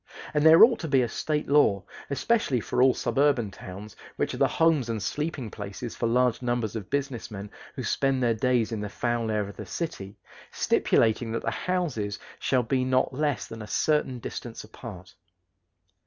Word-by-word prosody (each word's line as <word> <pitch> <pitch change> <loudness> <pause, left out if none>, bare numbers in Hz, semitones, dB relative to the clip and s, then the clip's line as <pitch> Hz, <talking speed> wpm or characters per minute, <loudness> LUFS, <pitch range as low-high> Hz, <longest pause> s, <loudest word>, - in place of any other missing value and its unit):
And 150 -1 +2
there 160 +4 +9
ought 235 0 +6
to 165 - -4
be 135 -3 +3
a - - 0
State 150 +5 -2
law, 135 -9 +4 0.3
especially 140 - +1
for 105 - -1
all 130 0 +5
suburban 125 -3 +1
towns, 95 +3 -10 0.2
which - - -1
are - - -5
the - - +4
homes 160 -7 +2
and 115 -1 -1
sleeping 145 0 -3
places 105 +3 -6
for 115 - -1
large 125 +1 +2
numbers 120 -3 -1
of 105 -4 -6
business 135 -4 -2
men 105 -1 -8 0.2
who - - -4
spend 135 -2 +1
their 120 -1 +3
days 120 0 +1
in 110 -2 -3
the 105 - -4
foul 120 +1 -1
air 105 -2 0
of 100 - -11
the - - -6
city, 100 - -5 0.3
stipulating 115 +1 +2
that 115 - -2
the - - -1
houses 145 - -2 0.2
shall 130 -2 +1
be 130 +2 0
not 130 +1 +1
less 145 0 -1
than 115 0 -9
a 105 - -7
certain 150 0 +1
distance 120 0 -7
apart. 110 -4 -10
120 Hz, 185 wpm, -27 LUFS, 110-140 Hz, 0.3 s, there